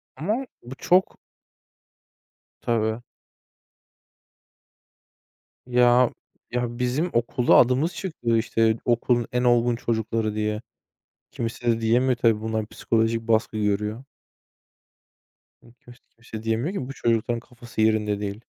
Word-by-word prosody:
Ama 215 - -2 0.2
bu 125 +2 -9
çok 180 +6 +2 1.4
Tabii. 110 0 0 2.7
Ya, 125 0 +4 0.4
ya 120 -1 -2
bizim 130 +8 0
okulda 120 +1 +2
adımız 130 +8 +4
çıkıyor 120 -11 -1
işte 115 0 +1
okulun 120 0 +1
en 125 0 0
olgun 120 -1 +3
çocukları 110 -2 -2
diye. 105 0 -2 0.7
Kimse 115 +1 -5
de 115 - -2
diyemiyor 120 +3 +2
tabii 115 -2 +2
bunlar 110 -1 -2
psikolojik 115 +1 0
baskı 110 0 +1
görüyor. 105 +3 -1 1.6
Iıı, 120 - -19
kimse 120 0 -17 0.2
kimse 110 -2 -9
diyemiyor 115 - -1
ki 135 -11 -4
bu - - -5
çocukların 115 -1 0
kafası 120 -1 -7
yerinde 110 -2 +2
değil. 105 +2 -5
115 Hz, 110 wpm, -24 LUFS, 110-125 Hz, 2.7 s, Ya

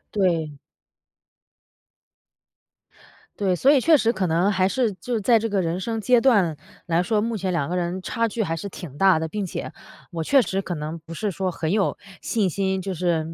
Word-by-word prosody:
对。 165 -6 +1 2.9
对， 190 -3 +1
所 270 - +4
以 275 -3 +4
确 315 +1 +5
实 230 0 +1
可 190 -3 -1
能 175 +5 +2
还 190 0 +2
是 235 -4 0
就 235 +4 -3
在 225 +2 +4
这 225 +1 -2
个 200 -1 0
人 170 +2 -2
生 225 +3 -3
阶 245 +1 +3
段 200 - +3 0.3
来 170 0 +1
说， 210 +4 +1
目 230 +1 -1
前 190 -2 -2
两 155 -5 -1
个 180 - -3
人 180 +1 -2
差 230 -1 0
距 220 0 -2
还 165 -3 -2
是 200 +5 -6
挺 165 -7 -9
大 190 -3 +5
的。 160 - -2
并 210 -1 -2
且 - - -5 0.4
我 165 -2 -3
确 275 - +4
实 195 -3 -2
可 175 -2 -4
能 155 +2 -5
不 165 +1 -11
是 210 +2 -2
说 185 +1 -2
很 165 -1 -3
有 205 -2 +1 0.2
信 210 -5 0
心， 190 +1 -1
就 190 0 -4
是 170 -2 0
190 Hz, 215 characters per minute, -23 LUFS, 170-220 Hz, 2.9 s, 确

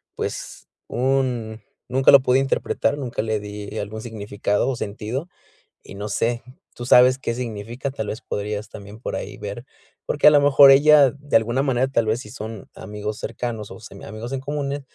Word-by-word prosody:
pues, - - -6 0.2
un 125 -4 -1 0.3
nunca 130 +1 +5
lo 140 - +8
pude 130 0 +3
interpretar, 135 +1 0
nunca 125 -4 -3
le 110 -1 -1
di 105 +1 -7
algún 110 +2 -5
significado 105 0 -2
o 135 - -1
sentido, 115 - -5 0.5
y - - -11
no 105 +1 -5
sé, 115 +3 0 0.3
¿tú 120 - -7
sabes 125 +1 +6
qué 115 - -2
significa?". 120 +2 -5
Tal 110 -5 -5
vez 110 - -5
podrías 105 +1 -4
también 105 +2 -11
por - - -4
ahí - - -7
ver. 105 +4 -7 0.4
Porque 145 - +3
a 150 - +10
lo 145 -1 +5
mejor 140 -1 +8
ella, 145 -1 +6
de 140 -1 -5
alguna 120 +4 0
manera, 130 -1 +1
tal 115 -4 0
vez, 110 +3 0
si 105 - -11
son 110 -1 -8
amigos 105 0 -6
cercanos 115 -4 -5
o - - -10
semiamigos 110 +3 -9
en 135 - -2
comunes, 145 0 -3
120 Hz, 180 wpm, -22 LUFS, 105-135 Hz, 0.5 s, a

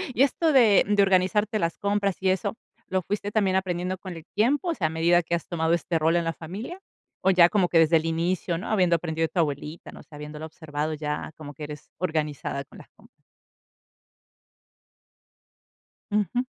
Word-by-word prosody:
Y 270 - +5
esto 315 +4 +2
de 225 -7 +6
de 205 -1 +4
organizarte 195 +3 +2
las 170 -1 -1
compras, 200 -1 0
y 190 - +2
eso, 190 +4 0 0.3
¿lo 185 0 0
fuiste, 205 +3 -3
también 200 -3 +2
aprendiendo 185 0 -1
con 185 0 -8
el 160 - -10
tiempo? 270 - +2
O 335 - +1
sea, 160 - 0
¿a - - -3
medida 170 +2 +3
que 170 - -1
has 170 - -5
tomado 165 -1 0
este 170 -1 0
rol 160 +2 +2
en 170 - +2
la 165 - -1
familia? 205 - -7 0.4
O 190 - +4
ya 180 -2 +6
como 190 -3 +2
que 170 - +3
desde 165 +1 +5
el 160 - -2
inicio, 170 +1 -1
¿no? 185 - -6
Habiendo 180 -5 +3
aprendido 165 -1 -1
de - - -5
tu 180 - -2
abuelita, 150 +1 -3
no - - -12
sé, 150 - -15
habiéndola 150 +1 -7
observado 155 -1 -4
ya 150 0 -4
como 145 -2 -9
que 150 - -9
eres 150 -1 -10
organizada 155 -5 -2
con 135 - -16
las - - -15
compras. - - -23 2.9
Ujú. 210 +4 +1
175 Hz, 195 wpm, -26 LUFS, 160-200 Hz, 2.9 s, de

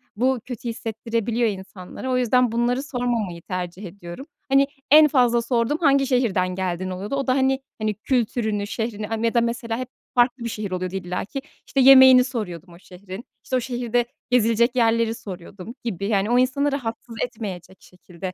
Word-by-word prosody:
bu 255 +3 +1
kötü 245 -1 -5
hissettirebiliyor 230 +1 -1
insanlara. 190 +5 -7
O 255 - +2
yüzden 250 -1 +3
bunları 240 +3 0
sormamayı 240 -10 -2
tercih 180 +2 -5
ediyorum. 175 +5 -9 0.2
Hani 275 +1 +4 0.2
en 305 +1 +9
fazla 245 -5 +3
sorduğum 235 +4 0
hangi 280 -4 +3
şehirden 200 -8 +1
geldin 185 0 -2
oluyordu. 190 +7 -4
O 275 0 -2
da 255 - +3
hani 265 0 +1 0.2
hani, 215 -1 0
kültürünü, 220 -2 -1
şehrini, 215 -1 -4
aaa, 225 - -1
ya 230 - +1
da 235 - +3
mesela 235 -1 -2
hep 255 +1 -5 0.3
farklı 245 0 +2
bir 235 - -2
şehir 210 -3 -5
oluyordu 185 0 -3
illa 180 -1 -3
ki. 270 +7 -6 0.3
İşte, 275 - -1
yemeğini 260 -1 +9
soruyordum 190 - -6
o 170 - -15
şehrin, 190 +4 -10 0.2
işte, 260 - -2
o - - +3
şehirde 245 -1 -1 0.2
gezilecek 235 0 +3
yerleri 230 -1 +2
soruyordum 190 +2 -9
gibi 200 -5 -3
yani 205 -1 +1
o 245 +1 +4
insanı 280 +3 +1
rahatsız 235 -3 -5
etmeyecek 195 -6 -6
şekilde 180 0 -9
230 Hz, 175 wpm, -23 LUFS, 195-250 Hz, 0.3 s, en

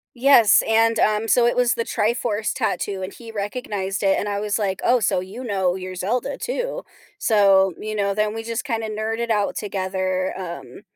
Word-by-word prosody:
Yes, 240 -5 +6
and, 225 0 +3
um, 215 +1 +1
so 240 +1 +4
it 240 - +2
was 245 0 +2
the 230 - -2
Triforce 220 -1 -1
tattoo 205 -5 -2
and 185 - -5
he 230 -2 -11
recognized 205 -2 -4
it, 195 -1 +3
and 205 - -2
I 200 0 -2
was 210 +1 -1
like, 195 -3 -2
"Oh, 245 0 +3
so 180 - +1
you 205 +8 -8
know 190 -4 0
your 185 0 -6
Zelda, 235 - -2
too?" - - -3 0.4
So, 195 -4 +4
you 215 0 -5
know, 200 -1 0
then 215 +1 0
we 225 - -4
just 230 +3 -4
kind 230 -5 -2
of 220 - -4
nerded 225 +2 -3
out 205 -2 +1
together, 185 -2 -2
um 180 +2 -8
210 Hz, 195 wpm, -22 LUFS, 195-230 Hz, 0.4 s, Yes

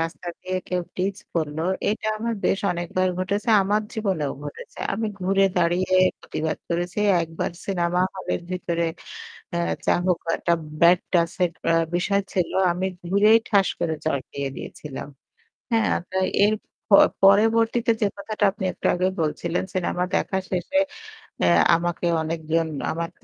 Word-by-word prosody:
রাস্তা 165 +1 -4
দিয়ে 185 0 -3
কেউ 180 -1 0
টিজ 190 +2 -1 0.2
করলো। 160 -1 -1 0.3
এটা 215 +1 -2
আমার 230 +1 -1
বেশ 195 - +2
অনেকবার 175 +2 -1
ঘটেছে, 200 +4 -2
আমার 210 +2 +1
জীবনেও 190 -10 -1
ঘটেছে। 145 - -9
আমি 220 +2 -1
ঘুরে 195 +1 +3
দাঁড়িয়ে 180 +2 +1 0.3
প্রতিবাদ 155 0 -3
করেছি। 175 +3 -2 0.2
একবার 165 0 -3 0.2
সিনেমা 180 -2 0
হলের 190 -2 -3
ভিতরে 170 -2 -1 0.7
অ্যা 170 - 0 0.2
যা - - +3
হোক 180 -2 +2 0.2
একটা 170 - +2 0.3
ব্যাড 175 +1 +7
টাচ 170 -1 +2
এর 175 - 0 0.2
অ্যা 165 - +4 0.2
বিষয় 200 +3 +1
ছিল। 180 -3 0 0.2
আমি 180 +2 -2 0.2
ঘুরেই 205 +5 +5
ঠাস 200 -2 +4
করে 160 -2 0
চড় 155 -3 +1
দিয়ে 140 -1 -3
দিয়েছিলাম, 145 -1 -7 0.6
হ্যাঁ? 225 -1 +3 0.2
তা 190 - -1 0.3
এর 210 +1 +3 0.4
প - - -1 0.3
পরবর্তীতে 225 +3 +4
যে - - +5
কথাটা 210 +1 -2
আপনি 200 -1 -6
একটু - - -4
আগেই 185 +1 +1
বলছিলেন, 165 +3 -1
সিনেমা 180 -1 0
দেখা 190 -2 0
শেষে 185 +10 0 0.6
অ্যা - - +4 0.3
আমাকে 175 0 -2 0.2
অনেকজন 160 0 -1 0.2
আমার 165 +1 -3
180 Hz, 145 wpm, -24 LUFS, 170-200 Hz, 0.7 s, ব্যাড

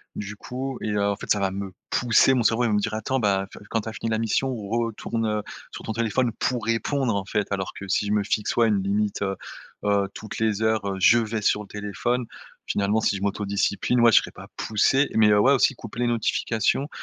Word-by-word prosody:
du 105 +1 -5
coup 130 +4 -5
et 110 - -2
heu, 105 -1 0
en 100 - 0
fait, - - -5
ça 105 - +3
va 95 -1 +1
me 95 -1 -6 0.2
pousser. 125 +2 +4
Mon 120 - +1
cerveau, 115 +2 +2
il - - +2
va 110 - 0
me 105 - +3
dire: 110 +2 -2
«Attends, 110 +5 -1
bah, 100 -3 +1
tu - - -12
vois, - - -13
quand 115 - +1
tu 110 - -6
as - - -8
fini 115 - -4
la 110 - +1
mission, 120 +4 0
retourne 115 0 -2 0.3
sur - - -9
ton 110 - -3
téléphone 115 +2 0
pour 125 -3 -1
répondre», 115 +1 0
en 100 -1 -2
fait. 105 +1 -1
Alors 95 -2 -2
que 95 - -8
si 105 - +1
je 105 - -2
me 105 -1 +2
fixe, 105 +1 -1
ouais, 115 -1 +4
une 100 -3 +1
limite, 100 +1 0
heu-heu, 100 +1 -3
toutes 110 - -8
les 110 -1 0
heures, 110 -2 +1
heu, 95 -1 -2
je 115 +5 +6
vais 110 -1 -1
sur 105 0 +2
le - - -14
téléphone. 105 +5 -2 0.4
Finalement, 105 +2 +1
si 100 - +1
je 100 - -6
m'autodiscipline, 100 +4 0
ouais, 115 -1 +7
je - - +6
serai - - -7
pas - - -12
poussé 135 +6 +2
mais 105 -1 +5
ouais, 105 +7 +5
aussi 135 +1 +3
couper 115 0 -8
les 120 - +2
notifications. 115 +3 0
110 Hz, 240 wpm, -24 LUFS, 100-115 Hz, 0.4 s, ouais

